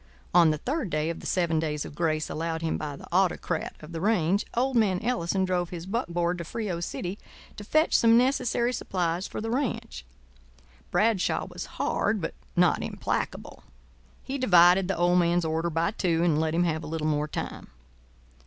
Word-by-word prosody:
On 170 -2 +6
the 155 - +1
third 265 - -2
day 155 +1 0
of 165 - -7
the - - -7
seven 170 -3 +1
days 150 -2 -2
of - - -9
grace 155 -1 0
allowed 165 +1 -3
him 160 - 0
by 150 -2 -4
the - - -12
autocrat 175 -2 0
of 155 +2 -11
the 165 -1 -5
range, 195 -1 +1
old 260 +2 +1
man 200 -6 +3
Ellison 195 -5 0
drove 180 -2 -1
his 170 -1 -7
buckboard 175 -5 -1
to - - -3
Frio 195 -1 -4
City 180 +3 -4 0.4
to 205 - -8
fetch 310 +9 +2
some 230 0 +6
necessary 250 -1 +1
supplies 180 -5 -2
for - - -6
the 225 +1 -3
ranch. 235 - -2 0.9
Bradshaw 215 -3 +1
was - - -7
hard - - 0
but - - -4 0.2
not - - +3
implacable. - - -4 0.6
He 275 +1 -4
divided 180 -5 +6
the 195 - -1
old 175 +1 +3
man's 175 0 +2
order 160 +2 0
by 165 +3 0
two, 170 -6 0
and 160 -3 +2
let 160 0 0
him 175 - +3
have 160 -2 -1
a - - -6
little 160 0 -3
more 150 -1 0
time. - - -6
175 Hz, 185 wpm, -27 LUFS, 165-205 Hz, 0.9 s, On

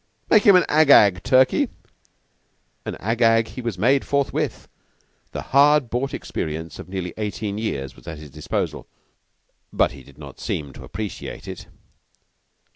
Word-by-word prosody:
"Make 215 - +7
him 200 - +8
an 180 - +5
Ag 155 -1 +3
Ag, 100 -9 +6
Turkey!" 130 0 +3 1.2
And - - -3
an - - -16
Ag 115 +3 -2
Ag 115 +1 +3
was 115 -4 -2
he 90 - -9
made, 135 +5 +3
forthwith. 140 -1 -1 0.6
The - - -5
hard 140 -2 +5
bought 130 +3 -1
experience 80 0 -5
of - - -9
nearly 95 -2 -4
eighteen 105 -1 -3
years 70 - -4
was - - -18
at 80 -2 -6
his 75 -2 -12
disposal, 75 +2 -4 0.8
but - - +2
he 70 +1 -12
did 70 +1 -18
not 70 -3 -11
seem 70 -3 -4
to - - -11
appreciate 110 -2 -7
it. - - -8
110 Hz, 160 wpm, -22 LUFS, 80-130 Hz, 1.2 s, him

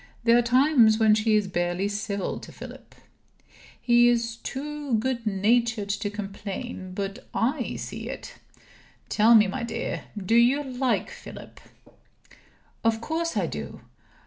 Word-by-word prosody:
There 230 0 +5
are 240 - +5
times 245 -2 +4
when 220 -1 +5
she 215 0 +2
is 210 -2 +2
barely 175 +1 -1
civil 205 -1 -3
to - - -11
Philip. - - -12 0.8
He 240 0 +5
is 230 -1 +1
too 290 -1 -4
good 235 0 -1
natured 215 +1 +1
to 205 +1 -1
complain, 200 -1 -6
but 200 +4 -5
I 250 +2 0
see - - -6
it. - - -7 0.8
Tell 225 +2 +5
me, 215 -1 +7
my 200 +6 -3
dear, 235 - -4
do 200 +2 -2
you 245 +5 +4
like 260 -1 -1
Philip?" - - -11 1.2
"Of 225 0 +2
course 320 +2 -2
I 190 - +1
do!" 75 - -6
225 Hz, 140 wpm, -26 LUFS, 205-245 Hz, 1.2 s, me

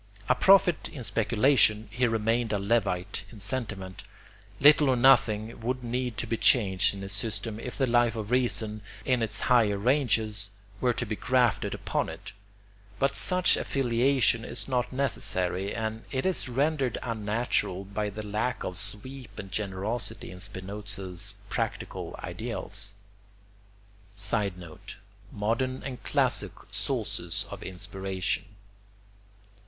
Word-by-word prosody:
A - - +5
prophet 180 +3 +4
in 140 -6 -8
speculation, 110 +1 +3
he 125 +2 +2
remained 115 0 +1
a 105 - +1
levite 100 -2 0
in 110 - -12
sentiment. 100 -3 -4 0.6
Little 145 0 +7
or 130 - +4
nothing 115 -3 +4
would 125 +2 -2
need 120 -1 -2
to 115 - -2
be 115 0 -1
changed 100 -6 +4
in 100 - -7
his 100 0 -3
system 110 +1 -2
if 125 +2 -6
the 135 - +3
Life 120 -1 +3
of 110 0 -5
Reason, 110 -4 +1 0.2
in 125 -2 +2
its 105 -3 0
higher 115 -5 +4
ranges, 110 -4 +1 0.3
were 125 - +3
to 120 - -2
be 110 0 -3
grafted 125 0 +1
upon - - -2
it; - - -9 0.7
but 140 0 +1
such 180 -1 +3
affiliation 125 -2 +2
is 115 - -3
not 125 -2 0
necessary, 100 -8 -1
and 110 0 -3
it 130 -1 -2
is 185 -8 +1
rendered 135 -1 +1
unnatural 110 -4 -1
by 105 +1 -2
the 105 +1 -7
lack 110 +4 -1
of 90 - -3
sweep 110 +7 -6
and 95 -2 -7
generosity 105 +1 -3
in 90 - -10
Spinoza's 100 -1 -4
practical - - -3
ideals. 100 +1 -4 1.2
[Sidenote: 95 -5 -3 0.4
Modern 115 +5 -1
and 130 -3 -6
classic - - +1 0.2
sources 105 -9 -1
of - - -7
inspiration. 95 0 -3
110 Hz, 130 wpm, -28 LUFS, 100-125 Hz, 1.2 s, Little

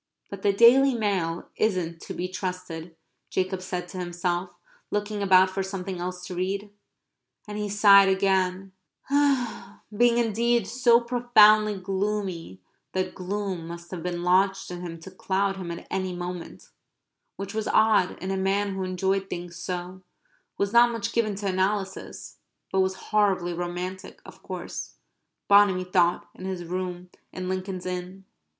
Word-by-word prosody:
"But 200 -1 -7
the 200 - +3
Daily 245 +6 +6
Mail 190 -7 -1
isn't 180 -6 -1
to - - -7
be 180 - -2
trusted," 180 -3 -6 0.3
Jacob 185 0 -1
said 180 -1 -4
to 185 - -7
himself, 175 0 -2 0.4
looking 205 0 -2
about 190 -1 +5
for 195 - -2
something 190 -1 -5
else 180 0 -5
to 180 - -6
read. 195 +3 -3 0.8
And 210 - -6
he 210 0 -2
sighed 200 -1 +7
again, 190 0 +1 1.2
being 240 +2 +4
indeed 235 0 +2
so 235 +1 +4
profoundly 215 -4 +5
gloomy 190 - -3 0.3
that 185 0 -1
gloom 185 -2 -4
must 170 0 -9
have 180 -3 -5
been 175 0 -3
lodged 190 +2 +2
in 175 0 -6
him 165 -2 -7
to 190 - -10
cloud 195 +1 -1
him 180 -3 -6
at 170 0 -6
any 185 -1 -2
moment, 175 -1 -7 0.7
which 195 +1 -6
was 220 0 -2
odd 215 -4 +3
in 190 - -2
a 195 - -1
man 195 +1 0
who 190 - -4
enjoyed 190 +1 -1
things 175 -1 -6
so, 180 +1 -5 0.6
was 200 +1 -1
not 240 +1 +7
much 230 -3 -3
given 215 -3 +1
to 205 +1 -6
analysis, 190 +1 -2 0.3
but 190 - +1
was 190 0 +1 0.2
horribly 195 -5 +2
romantic, 180 +2 -5
of - - -14
course, - - -7 0.5
Bonamy 200 -2 +5
thought, 180 -1 +1
in 185 - -10
his 185 -2 -4
rooms 180 0 -4 0.2
in 185 0 -5
Lincoln's 185 0 -4
Inn. 185 +1 -5
190 Hz, 150 wpm, -26 LUFS, 180-205 Hz, 1.2 s, sighed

